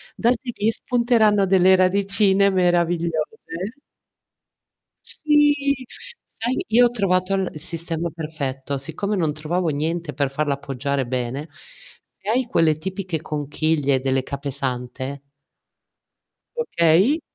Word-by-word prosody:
Da 235 Hz, -, +2 dB
lì 245 Hz, -, -4 dB
ti 215 Hz, -1 st, 0 dB
spunteranno 225 Hz, -5 st, +2 dB
delle 190 Hz, 0 st, +5 dB
radicine 200 Hz, +1 st, +3 dB
meravigliose. 175 Hz, 0 st, +1 dB, 1.7 s
Sì, 295 Hz, -2 st, +2 dB, 0.5 s
sai 240 Hz, +3 st, -2 dB
io 245 Hz, +2 st, +6 dB
ho -, -, +3 dB
trovato 190 Hz, -4 st, +1 dB
il 190 Hz, -5 st, -2 dB
sistema 170 Hz, 0 st, -3 dB
perfetto, 145 Hz, -4 st, -4 dB
siccome 165 Hz, +9 st, -3 dB
non 160 Hz, -5 st, 0 dB
trovavo 165 Hz, +3 st, -1 dB
niente 160 Hz, +2 st, -2 dB
per 140 Hz, -3 st, 0 dB
farla 145 Hz, +1 st, -1 dB
appoggiare 140 Hz, 0 st, -2 dB
bene, 130 Hz, +4 st, -3 dB
se 485 Hz, -, -13 dB
hai 250 Hz, +2 st, +2 dB
quelle 165 Hz, -8 st, +2 dB
tipiche 185 Hz, 0 st, -4 dB
conchiglie 145 Hz, -2 st, 0 dB
delle 135 Hz, 0 st, 0 dB
capesante 135 Hz, -1 st, -4 dB, 1.4 s
Okay. 190 Hz, -, +3 dB
170 Hz, 105 wpm, -22 LUFS, 145-200 Hz, 1.7 s, io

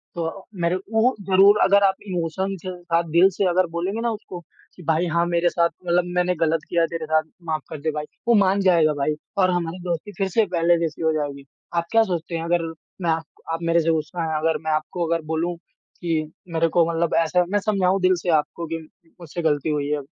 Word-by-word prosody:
तो 170 Hz, +3 st, -4 dB, 0.2 s
मेरे 170 Hz, +2 st, +2 dB
उ 220 Hz, +6 st, +1 dB, 0.2 s
ज़रूर 195 Hz, +2 st, +6 dB
अगर 200 Hz, +1 st, +5 dB
आप 190 Hz, -1 st, +4 dB
इमोशन 185 Hz, +2 st, -2 dB
के -, -, -3 dB
साथ 170 Hz, 0 st, +1 dB
दिल 175 Hz, +3 st, +6 dB
से 200 Hz, -, +1 dB
अगर 180 Hz, 0 st, +2 dB
बोलेंगे 190 Hz, +6 st, -2 dB
ना 235 Hz, -, 0 dB
उसको, 205 Hz, -4 st, -7 dB, 0.4 s
कि 180 Hz, -, -13 dB
भाई 160 Hz, +2 st, +2 dB
हाँ 170 Hz, 0 st, +3 dB
मेरे 175 Hz, 0 st, +2 dB
साथ 170 Hz, -1 st, +2 dB, 0.2 s
मतलब 175 Hz, 0 st, +3 dB
मैंने 180 Hz, 0 st, +2 dB
गलत 165 Hz, 0 st, +2 dB
किया 170 Hz, -1 st, +2 dB
तेरे 165 Hz, -2 st, -5 dB
साथ, 155 Hz, 0 st, +2 dB, 0.2 s
माफ 155 Hz, -3 st, -2 dB
कर 150 Hz, -, -6 dB
दे 155 Hz, 0 st, 0 dB
भाई, 150 Hz, 0 st, -4 dB, 0.2 s
वो 235 Hz, -, +5 dB
मान 195 Hz, -1 st, +3 dB
जाएगा 165 Hz, -5 st, +4 dB
भाई 145 Hz, +1 st, -1 dB, 0.2 s
और 185 Hz, -1 st, +4 dB
हमारी 175 Hz, 0 st, -2 dB
दोस्ती 175 Hz, +3 st, -3 dB
फिर 195 Hz, -1 st, 0 dB
से 220 Hz, +3 st, +2 dB
पहले 170 Hz, -1 st, +2 dB
जैसी 165 Hz, -1 st, -3 dB
हो 160 Hz, 0 st, +2 dB
जाएगी। 140 Hz, -2 st, -3 dB, 0.3 s
आप 170 Hz, 0 st, +1 dB
क्या 225 Hz, 0 st, +5 dB
सोचते 175 Hz, -4 st, -3 dB
हैं 165 Hz, -, -2 dB
अगर 170 Hz, 0 st, +1 dB, 0.4 s
मैं 170 Hz, -, 0 dB
आप 160 Hz, 0 st, 0 dB, 0.3 s
आप 165 Hz, -, -2 dB
मेरे 165 Hz, 0 st, +3 dB
से 165 Hz, -, 0 dB
गुस्सा 160 Hz, +2 st, -2 dB
हैं, 160 Hz, -1 st, -1 dB
अगर 160 Hz, 0 st, +1 dB
मैं 160 Hz, -, 0 dB
आपको 160 Hz, +3 st, -1 dB
अगर 165 Hz, 0 st, 0 dB
बोलूँ 165 Hz, +2 st, -1 dB, 0.5 s
कि 160 Hz, -3 st, -1 dB, 0.2 s
मेरे 165 Hz, 0 st, +2 dB
को 170 Hz, -, +6 dB
मतलब 165 Hz, 0 st, 0 dB
ऐसे 180 Hz, +2 st, +2 dB
मैं 205 Hz, -, +2 dB
समझाऊँ 195 Hz, -2 st, +1 dB
दिल 185 Hz, 0 st, +4 dB
से 180 Hz, -, -3 dB
आपको 165 Hz, +3 st, -5 dB
कि 165 Hz, +1 st, -3 dB, 0.4 s
मुझसे 170 Hz, +1 st, -5 dB
गलती 150 Hz, -1 st, +1 dB
हुई 145 Hz, -1 st, -1 dB
है, 150 Hz, -1 st, 0 dB
170 Hz, 225 wpm, -23 LUFS, 160-185 Hz, 0.5 s, ज़रूर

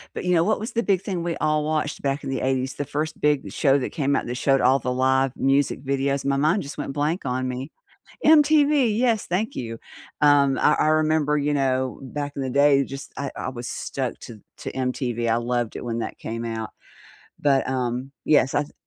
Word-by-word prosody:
but -, -, -4 dB
you 180 Hz, -, +2 dB
know 165 Hz, -1 st, +4 dB
what 215 Hz, +5 st, +1 dB
was 220 Hz, +3 st, -5 dB
the 235 Hz, -, 0 dB
big 195 Hz, -5 st, +1 dB
thing 185 Hz, -4 st, -3 dB
we 170 Hz, -1 st, -2 dB
all 155 Hz, 0 st, +1 dB
watched 150 Hz, -1 st, -2 dB
back 140 Hz, +1 st, -1 dB
in -, -, -4 dB
the 135 Hz, -, -2 dB
80s? 130 Hz, 0 st, 0 dB
The 145 Hz, -, -4 dB
1st 150 Hz, +2 st, -4 dB
big 150 Hz, -2 st, +1 dB
show 140 Hz, -2 st, +3 dB
that 135 Hz, -, -3 dB
came 140 Hz, -3 st, 0 dB
out -, -, -1 dB
that 120 Hz, -, -4 dB
showed 135 Hz, 0 st, +2 dB
all 130 Hz, +2 st, +4 dB
the 125 Hz, 0 st, -2 dB
live 130 Hz, +1 st, +2 dB
music 135 Hz, 0 st, +1 dB
videos 140 Hz, 0 st, -1 dB
my 140 Hz, 0 st, +1 dB
mind 155 Hz, +8 st, +2 dB
just 140 Hz, -, -8 dB
went 140 Hz, -, -4 dB
blank 150 Hz, +6 st, -1 dB
on 130 Hz, 0 st, -1 dB
me. 130 Hz, +4 st, -5 dB, 0.5 s
MTV, 295 Hz, -3 st, +5 dB
yes, 230 Hz, -3 st, +1 dB
thank 190 Hz, +5 st, -1 dB
you. 115 Hz, -2 st, -5 dB, 0.4 s
Um, 140 Hz, -2 st, +4 dB
I 150 Hz, -, +4 dB
I -, -, +1 dB
remember, 155 Hz, -1 st, +2 dB
you 145 Hz, 0 st, 0 dB
know, 130 Hz, -2 st, 0 dB
back 145 Hz, +2 st, -4 dB
in 140 Hz, -, -3 dB
the 130 Hz, -, -2 dB
day, 140 Hz, +1 st, +4 dB
just, 135 Hz, +1 st, -8 dB
I 140 Hz, -1 st, -3 dB
I -, -, -4 dB
was 120 Hz, -1 st, -7 dB
stuck 130 Hz, -3 st, -4 dB
to 115 Hz, -3 st, -10 dB, 0.2 s
to -, -, -5 dB
MTV. 125 Hz, -2 st, -2 dB
I 115 Hz, -, +3 dB
loved 120 Hz, -1 st, -2 dB
it -, -, -6 dB
when 115 Hz, -1 st, -2 dB
that 115 Hz, -, -5 dB
came 115 Hz, +1 st, -5 dB
out, 110 Hz, -3 st, -4 dB, 0.7 s
but, 140 Hz, -2 st, +2 dB
um, 130 Hz, 0 st, -2 dB
yes, 140 Hz, -3 st, +3 dB
I -, -, +3 dB
s 145 Hz, -, -12 dB
140 Hz, 225 wpm, -24 LUFS, 130-155 Hz, 0.7 s, MTV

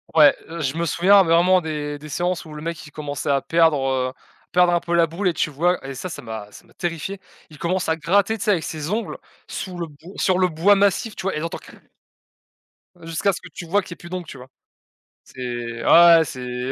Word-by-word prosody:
Ouais, 150 Hz, -2 st, +7 dB, 0.2 s
je 140 Hz, -1 st, -2 dB
me 170 Hz, -, 0 dB
souviens 190 Hz, +5 st, +5 dB
vraiment 175 Hz, +2 st, +4 dB
des 150 Hz, -2 st, -4 dB
des 150 Hz, +1 st, -11 dB
séances 175 Hz, +3 st, -1 dB
où 155 Hz, -2 st, -11 dB
le 150 Hz, -, -8 dB
mec 165 Hz, 0 st, -5 dB
il 145 Hz, -, -13 dB
commençait 145 Hz, -1 st, -5 dB
à 140 Hz, -1 st, +2 dB
perdre, 160 Hz, -5 st, +2 dB, 0.2 s
heu, -, -, -11 dB, 0.4 s
perdre 180 Hz, -1 st, +4 dB
un 175 Hz, -, +2 dB
peu 170 Hz, -, -4 dB
la 170 Hz, -1 st, +4 dB
boule 180 Hz, +4 st, -1 dB
et -, -, -1 dB
tu 160 Hz, -, 0 dB
vois, 170 Hz, +2 st, 0 dB
et 135 Hz, -, -5 dB
ça, 185 Hz, +8 st, -5 dB
ça -, -, -7 dB
m'a 110 Hz, -2 st, -7 dB
ça -, -, -15 dB
m'a -, -, -24 dB
terrifié. 175 Hz, +3 st, -4 dB, 0.3 s
Il 150 Hz, -, -14 dB
commence 180 Hz, +2 st, -1 dB
à 160 Hz, -, +2 dB
gratter, 200 Hz, +7 st, +1 dB
tu -, -, -5 dB
sais, 210 Hz, -, +2 dB
avec 165 Hz, -5 st, +1 dB
ses 155 Hz, -1 st, -5 dB
ongles 220 Hz, +4 st, -2 dB, 0.3 s
sous 185 Hz, -2 st, -6 dB
le 170 Hz, -1 st, -4 dB
b 150 Hz, -, -16 dB, 0.2 s
sur 185 Hz, -1 st, +2 dB
le 185 Hz, -, +3 dB
bois 170 Hz, +6 st, +4 dB
massif, 200 Hz, +2 st, +1 dB
tu -, -, -7 dB
vois, 195 Hz, -4 st, -1 dB
et -, -, -2 dB
là 155 Hz, -, -5 dB
tu -, -, -6 dB
entends: -, -, -4 dB
«Krr». -, -, -15 dB, 1.2 s
Jusqu'à 165 Hz, +4 st, 0 dB
ce -, -, -6 dB
que 180 Hz, -, -11 dB
tu 170 Hz, -, -9 dB
vois 200 Hz, +5 st, +2 dB
qu'il -, -, -13 dB
y -, -, -3 dB
ait -, -, -15 dB
plus 175 Hz, -, -12 dB
d'ongles, 180 Hz, -2 st, -5 dB
tu 135 Hz, -, -9 dB
vois? 125 Hz, +1 st, -13 dB, 0.7 s
C'est, 120 Hz, -2 st, -6 dB
ah, 170 Hz, 0 st, +8 dB
ouais, -, -, +7 dB
ouais, 160 Hz, -, +2 dB
c'est 125 Hz, -1 st, -5 dB
165 Hz, 255 wpm, -22 LUFS, 145-180 Hz, 1.2 s, ah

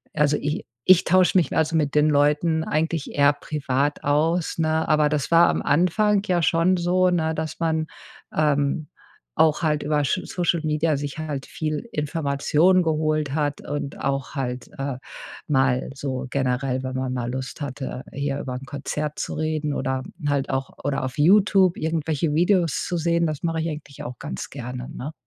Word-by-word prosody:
also 150 Hz, -1 st, +3 dB
i 150 Hz, +1 st, -3 dB, 0.2 s
ich 185 Hz, -2 st, +8 dB
tausche 185 Hz, +1 st, +4 dB
mich 165 Hz, -7 st, +1 dB
also 160 Hz, +1 st, +1 dB
mit 150 Hz, -3 st, +1 dB
den 150 Hz, +1 st, +4 dB
Leuten 150 Hz, +3 st, +2 dB
eigentlich 160 Hz, -1 st, -1 dB
eher 145 Hz, 0 st, +4 dB
privat 145 Hz, -1 st, -2 dB
aus, 160 Hz, +5 st, +1 dB
ne, 160 Hz, 0 st, +1 dB
aber 150 Hz, -1 st, +4 dB
das 150 Hz, -2 st, -1 dB
war 170 Hz, +1 st, +6 dB
am -, -, 0 dB
Anfang 195 Hz, +6 st, +2 dB
ja 180 Hz, -3 st, +1 dB
schon 170 Hz, +3 st, +3 dB
so, 180 Hz, +1 st, +2 dB
ne, 160 Hz, -2 st, 0 dB
dass 160 Hz, 0 st, -4 dB
man, 160 Hz, -1 st, 0 dB, 0.5 s
ähm, 150 Hz, 0 st, +1 dB, 0.5 s
auch 155 Hz, 0 st, +3 dB
halt 150 Hz, -2 st, +1 dB
über 150 Hz, 0 st, +1 dB
Sch -, -, +1 dB
Social-Media, 160 Hz, -3 st, 0 dB
sich 145 Hz, +1 st, -5 dB
halt 145 Hz, -4 st, -4 dB
viel 155 Hz, -1 st, -3 dB
Informationen 150 Hz, +4 st, +2 dB
geholt 155 Hz, -2 st, 0 dB
hat 145 Hz, -2 st, -1 dB
und 145 Hz, -1 st, -5 dB
auch 135 Hz, -1 st, -2 dB
halt, 125 Hz, -2 st, -4 dB
äh, 135 Hz, -2 st, -2 dB, 0.5 s
mal 130 Hz, -3 st, +2 dB
so 135 Hz, -1 st, -3 dB
generell, 130 Hz, -1 st, -1 dB
wenn 130 Hz, 0 st, -4 dB
man 130 Hz, -1 st, -2 dB
mal 120 Hz, -1 st, -3 dB
Lust 130 Hz, +3 st, -5 dB
hatte, 135 Hz, -2 st, -5 dB
hier 140 Hz, 0 st, -2 dB
über 125 Hz, -1 st, -5 dB
'n 130 Hz, -, -7 dB
Konzert 150 Hz, +1 st, -4 dB
zu -, -, -3 dB
reden 155 Hz, -2 st, -1 dB
oder 130 Hz, 0 st, -1 dB, 0.3 s
halt 140 Hz, -2 st, 0 dB
auch 135 Hz, 0 st, -2 dB
oder 140 Hz, -1 st, -1 dB
auf 130 Hz, +1 st, -6 dB
Youtube 190 Hz, +1 st, +5 dB
irgendwelche 160 Hz, -1 st, -1 dB
Videos 175 Hz, -2 st, +2 dB
zu 175 Hz, -, -2 dB
sehen, 170 Hz, +1 st, +1 dB
das 155 Hz, +1 st, -4 dB
mache 165 Hz, -1 st, 0 dB
ich 165 Hz, -, -1 dB
eigentlich 150 Hz, -2 st, -8 dB
auch 125 Hz, 0 st, -7 dB
ganz 145 Hz, -, -6 dB
gerne, 125 Hz, -1 st, -6 dB
ne? 145 Hz, +5 st, -6 dB
150 Hz, 175 wpm, -23 LUFS, 140-160 Hz, 0.5 s, ich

